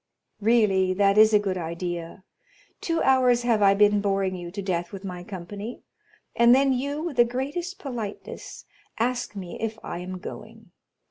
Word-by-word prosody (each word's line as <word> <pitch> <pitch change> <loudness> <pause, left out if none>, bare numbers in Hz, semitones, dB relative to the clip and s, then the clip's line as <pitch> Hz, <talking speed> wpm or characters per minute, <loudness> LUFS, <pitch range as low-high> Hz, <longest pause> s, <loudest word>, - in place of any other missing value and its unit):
"Really, 200 -4 +3
that 200 0 +3
is 215 0 +7
a 210 - +6
good 195 -3 -2
idea!—two 175 - -5
hours 250 -2 +4
have 230 -3 +2
I 200 -1 +5
been 205 0 +4
boring 195 -2 0
you 175 -1 -7
to 200 +3 -6
death 175 -2 -2
with 195 0 -8
my 180 -2 -6
company, 200 +4 -7 0.5
and 235 +1 +6
then 270 0 +3
you, 285 +4 -2
with 330 -7 -4
the 240 - +8
greatest 285 +10 -4
politeness, 235 -7 -7 0.3
ask 240 -2 -1
me 185 -3 -7
if 225 -1 -3
I - - -5
am 185 +1 -6
going. 180 - -10
210 Hz, 160 wpm, -25 LUFS, 185-245 Hz, 0.5 s, the